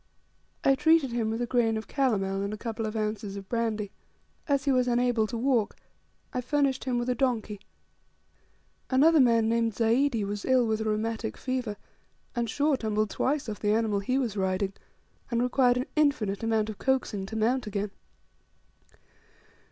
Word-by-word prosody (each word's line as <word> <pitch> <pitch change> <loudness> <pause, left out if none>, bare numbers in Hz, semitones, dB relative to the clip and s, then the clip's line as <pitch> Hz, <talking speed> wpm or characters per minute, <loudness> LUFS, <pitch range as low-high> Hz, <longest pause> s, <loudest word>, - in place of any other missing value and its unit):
I 270 - +5
treated 300 -1 +3
him 235 -2 -1
with 225 +2 -1
a - - 0
grain 230 -2 +1
of 220 -2 -6
calomel, 195 -8 0
and 200 +1 -2
a - - -11
couple 225 0 -4
of 215 - -5
ounces 210 -2 -3
of 195 -1 -8
brandy. 220 -3 -1 0.6
As 280 -2 +1
he 280 - +3
was 255 -1 +2
unable 240 -2 +2
to 235 - -4
walk, 240 -3 +1 0.6
I 250 - -1
furnished 270 0 0
him 250 -2 0
with 240 0 -1
a 250 - +2
donkey. 225 -5 -1 1.3
Another 305 +5 +5
man 230 -4 +4
named 230 -1 +1
Zaidi 230 +2 +2
was 205 +1 -4
ill 260 -2 +3
with 220 -1 0
a - - -2
rheumatic 220 +1 -2
fever; 255 -5 -3 0.6
and 235 -1 -1
Shaw 290 +5 +2
tumbled 215 -3 -1
twice 285 0 -1
off 210 -2 -5
the 210 0 +1
animal 220 -2 +1
he 255 +7 0
was 240 -6 -1
riding, 190 0 -1 0.6
and 235 0 +1
required 250 0 +3
an 250 - -1
infinite 275 -10 +1
amount 220 -1 0
of 210 - -12
coaxing 255 -7 0
to 220 - -7
mount 240 +2 +1
again. 205 0 -3
230 Hz, 175 wpm, -28 LUFS, 215-255 Hz, 1.3 s, I